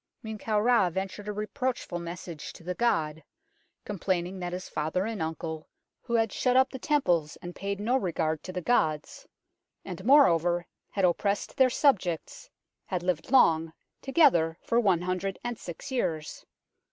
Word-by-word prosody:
Men 220 Hz, -1 st, -6 dB
kau 215 Hz, 0 st, 0 dB
Ra 230 Hz, -4 st, +4 dB
ventured 195 Hz, +3 st, -5 dB
a -, -, -1 dB
reproachful 215 Hz, -2 st, -3 dB
message 170 Hz, -2 st, -7 dB
to -, -, -14 dB
the 180 Hz, +2 st, -3 dB
god, 160 Hz, -9 st, 0 dB, 0.6 s
complaining 185 Hz, -2 st, -2 dB
that 175 Hz, -1 st, -4 dB
his 180 Hz, +1 st, -5 dB
father 160 Hz, +5 st, -1 dB
and 220 Hz, -4 st, -4 dB
uncle, 160 Hz, 0 st, -4 dB, 0.3 s
who 235 Hz, -, -2 dB
had 225 Hz, -2 st, +2 dB
shut 255 Hz, 0 st, +2 dB
up 260 Hz, 0 st, +4 dB
the 265 Hz, -, -6 dB
temples 175 Hz, -, +1 dB
and 175 Hz, 0 st, -8 dB
paid 200 Hz, 0 st, -3 dB
no 230 Hz, +5 st, +1 dB
regard 160 Hz, -, -1 dB
to 185 Hz, -, -7 dB
the 180 Hz, -1 st, -4 dB
gods, 155 Hz, -10 st, 0 dB, 0.6 s
and 185 Hz, -1 st, -7 dB
moreover, 175 Hz, -, +5 dB, 0.2 s
had 195 Hz, -2 st, +1 dB
oppressed 200 Hz, +3 st, 0 dB
their 260 Hz, -1 st, +5 dB
subjects, 195 Hz, -, 0 dB, 0.4 s
had 180 Hz, -2 st, -2 dB
lived 175 Hz, -3 st, -1 dB
long, 165 Hz, -11 st, +4 dB, 0.3 s
together 175 Hz, -, +3 dB
for 235 Hz, -, +2 dB
one 190 Hz, -7 st, +2 dB
hundred 185 Hz, +1 st, -2 dB
and 240 Hz, -2 st, -4 dB
six 180 Hz, +10 st, -8 dB
years. 160 Hz, -12 st, -3 dB
185 Hz, 160 wpm, -28 LUFS, 170-225 Hz, 0.6 s, moreover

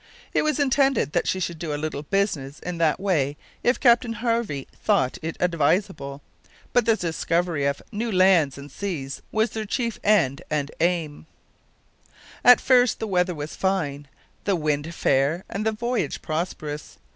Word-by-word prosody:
It -, -, +3 dB
was 305 Hz, 0 st, 0 dB
intended 270 Hz, -, +2 dB
that 175 Hz, -, 0 dB
she 185 Hz, -, 0 dB
should 170 Hz, -2 st, -3 dB
do 155 Hz, -3 st, -3 dB
a -, -, -3 dB
little 155 Hz, -1 st, -3 dB
business 150 Hz, -6 st, -1 dB
in 180 Hz, -1 st, -5 dB
that 160 Hz, -1 st, +2 dB
way 150 Hz, -8 st, 0 dB, 0.3 s
if 245 Hz, -, +2 dB
Captain 240 Hz, -2 st, +4 dB
Harvey 230 Hz, -, -1 dB, 0.2 s
thought 130 Hz, -1 st, +2 dB
it 165 Hz, +1 st, -4 dB
advisable, 165 Hz, -4 st, 0 dB, 0.5 s
but 240 Hz, -2 st, +3 dB
the 225 Hz, -, +5 dB
discovery 170 Hz, -3 st, -1 dB
of 140 Hz, -, -2 dB
new 225 Hz, +2 st, -2 dB
lands 185 Hz, -7 st, +4 dB
and 140 Hz, 0 st, -10 dB
seas 150 Hz, -9 st, -4 dB
was 220 Hz, +1 st, +1 dB
their 220 Hz, -, -3 dB
chief 235 Hz, 0 st, -2 dB
end 170 Hz, -11 st, +3 dB
and 145 Hz, -1 st, -1 dB
aim. 165 Hz, -3 st, -1 dB, 1.2 s
At 250 Hz, 0 st, +8 dB
first 250 Hz, -2 st, +4 dB
the -, -, -2 dB
weather 180 Hz, -3 st, +1 dB
was 150 Hz, 0 st, -6 dB
fine, 150 Hz, -7 st, -1 dB, 0.4 s
the 200 Hz, -, +2 dB
wind 155 Hz, 0 st, -1 dB
fair, 140 Hz, +7 st, +1 dB
and 215 Hz, +2 st, -3 dB
the -, -, +3 dB
voyage 230 Hz, -, -2 dB
prosperous. 155 Hz, -, -4 dB
175 Hz, 160 wpm, -24 LUFS, 145-215 Hz, 1.2 s, At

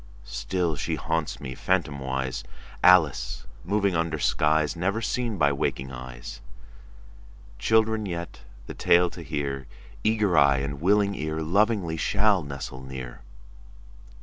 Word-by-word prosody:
Still 85 Hz, +3 st, -2 dB
she 70 Hz, -, -2 dB
haunts 80 Hz, -1 st, -2 dB
me, 65 Hz, -2 st, -6 dB
phantomwise, 65 Hz, -6 st, -1 dB, 0.4 s
Alice 90 Hz, -9 st, +4 dB, 0.2 s
moving 100 Hz, -3 st, +1 dB
under 80 Hz, -1 st, 0 dB
skies 75 Hz, +1 st, +2 dB
Never 100 Hz, +6 st, 0 dB
seen 115 Hz, -1 st, -2 dB
by 75 Hz, -3 st, +3 dB
waking 65 Hz, -1 st, -2 dB
eyes. -, -, -8 dB, 1.2 s
Children 110 Hz, -1 st, +2 dB
yet, 85 Hz, -2 st, -5 dB, 0.3 s
the -, -, -7 dB
tale 85 Hz, 0 st, +4 dB
to 85 Hz, -, -9 dB
hear, 70 Hz, -4 st, -3 dB, 0.4 s
Eager 105 Hz, -4 st, +2 dB
eye 70 Hz, -3 st, +5 dB
and 70 Hz, +1 st, -3 dB
willing 100 Hz, +2 st, +3 dB
ear, 80 Hz, -2 st, -3 dB
Lovingly 95 Hz, -1 st, +1 dB
shall 100 Hz, +2 st, +2 dB
nestle 70 Hz, -2 st, -7 dB
near. 65 Hz, -2 st, -8 dB
80 Hz, 120 wpm, -26 LUFS, 70-100 Hz, 1.2 s, eye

